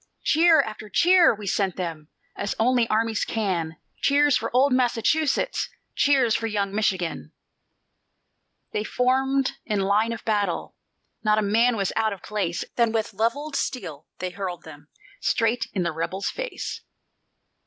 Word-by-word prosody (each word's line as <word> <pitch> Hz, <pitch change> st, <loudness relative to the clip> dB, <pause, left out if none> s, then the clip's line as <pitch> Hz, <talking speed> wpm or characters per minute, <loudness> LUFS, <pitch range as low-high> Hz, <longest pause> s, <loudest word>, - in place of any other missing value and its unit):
Cheer 325 Hz, +1 st, +5 dB
after 215 Hz, 0 st, -8 dB
cheer 345 Hz, -, +5 dB
we 210 Hz, 0 st, -9 dB
sent 195 Hz, -1 st, 0 dB
them, 165 Hz, -4 st, -5 dB, 0.3 s
As 200 Hz, -, -3 dB
only 240 Hz, 0 st, +2 dB
armies 220 Hz, 0 st, 0 dB
can, 175 Hz, -7 st, -2 dB, 0.2 s
Cheers 290 Hz, 0 st, +4 dB
for -, -, -1 dB
old 260 Hz, +2 st, +3 dB
Massachusetts, 260 Hz, -, +1 dB, 0.2 s
Cheers 265 Hz, -5 st, +3 dB
for 225 Hz, -, 0 dB
young 200 Hz, -2 st, -2 dB
Michigan! 190 Hz, -5 st, -1 dB, 1.4 s
They 210 Hz, -, -1 dB
formed 265 Hz, +3 st, +1 dB
in 210 Hz, -3 st, -1 dB
line 205 Hz, +4 st, +2 dB
of 230 Hz, -, -6 dB
battle; 210 Hz, -2 st, -1 dB, 0.5 s
Not 215 Hz, -1 st, +3 dB
a 215 Hz, -, +2 dB
man 230 Hz, +4 st, +3 dB
was 195 Hz, -2 st, -1 dB
out 220 Hz, -1 st, +1 dB
of 190 Hz, -, -11 dB
place. 195 Hz, -5 st, -2 dB
Then 235 Hz, -2 st, +3 dB
with 225 Hz, 0 st, -2 dB
levelled 280 Hz, +7 st, -1 dB
steel 160 Hz, -, -4 dB
they 185 Hz, 0 st, -4 dB
hurled 180 Hz, -2 st, -5 dB
them 145 Hz, -2 st, -13 dB, 0.3 s
Straight 230 Hz, +1 st, +1 dB
in 185 Hz, -, -1 dB
the 170 Hz, -, -1 dB
rebels' 175 Hz, +5 st, -3 dB
face. -, -, -5 dB
220 Hz, 145 wpm, -24 LUFS, 195-255 Hz, 1.4 s, Cheer